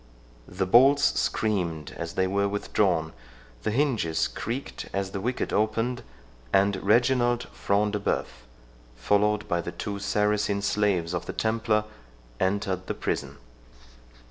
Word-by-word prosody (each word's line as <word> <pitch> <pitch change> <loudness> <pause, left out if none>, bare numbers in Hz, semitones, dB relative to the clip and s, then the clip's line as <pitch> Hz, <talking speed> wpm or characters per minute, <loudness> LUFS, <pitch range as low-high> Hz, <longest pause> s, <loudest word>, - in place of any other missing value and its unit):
The 95 +1 -2
bolts 135 +8 +5
screamed 85 -8 -1
as 85 0 -5
they 95 - +1
were 100 +2 +1
withdrawn—the 80 - -2
hinges 110 - +1
creaked 120 +5 -5
as 100 -1 -2
the 100 - -4
wicket 125 +4 -2
opened, 115 +4 0 0.5
and 100 +1 +3
Reginald 120 +3 +3
Front 105 +1 0
de 105 - -1
Bœuf, 100 - 0 0.7
followed 105 +10 +1
by 85 0 0
the - - -5
two 100 -1 -5
Saracen 105 0 0
slaves 100 -5 +1
of 90 - -3
the - - -4
Templar, 110 -1 +1 0.6
entered 95 -1 -1
the - - -2
prison. - - -3
100 Hz, 125 wpm, -26 LUFS, 95-110 Hz, 0.7 s, bolts